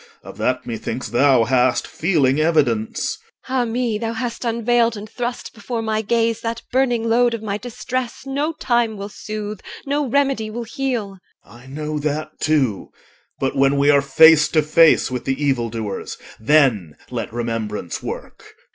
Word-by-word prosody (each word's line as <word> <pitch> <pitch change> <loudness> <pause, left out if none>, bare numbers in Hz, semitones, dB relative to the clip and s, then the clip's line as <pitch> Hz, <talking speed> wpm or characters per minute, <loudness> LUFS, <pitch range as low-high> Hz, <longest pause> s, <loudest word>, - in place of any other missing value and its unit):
Of - - -11
that 130 0 0
methinks 120 +1 -4
thou 130 0 +4
hast 125 +1 +2
feeling 155 -6 +1
evidence. 140 -9 +1 0.3
EL. 260 - -3
Ah 245 - +2
me! 230 -2 -1
thou 225 0 -2
hast 235 0 -4
unveiled 235 0 +1
And 205 +1 -8
thrust 240 +2 -5
before 230 +1 -4
my 220 0 0
gaze 230 +1 0
That 230 0 -4
burning 245 -3 +1
load 240 +1 +3
of 225 - -8
my 205 -1 -3
distress 245 +1 -4
No 285 +4 -1
time 240 -7 0
will 200 +1 -6
soothe, 210 0 -6 0.3
no 285 -1 -1
remedy 270 -4 +1
will 235 +2 -5
heal. 230 -5 -3 0.3
OR. - - -20
I 120 +3 -15
know 150 +2 -4
that 155 +1 -2
too. 135 -10 0 0.5
But 135 - -1
when 135 +1 +3
we 140 +1 +5
are 140 -1 +5
face 155 +3 +6
to 155 -2 +2
face 155 -2 +4
With 125 -1 -4
the 135 0 -1
evildoers, 115 -7 -2 0.2
then 110 - +3 0.2
let - - -4
remembrance 115 -6 -3
work. - - -8
195 Hz, 165 wpm, -20 LUFS, -, 0.5 s, face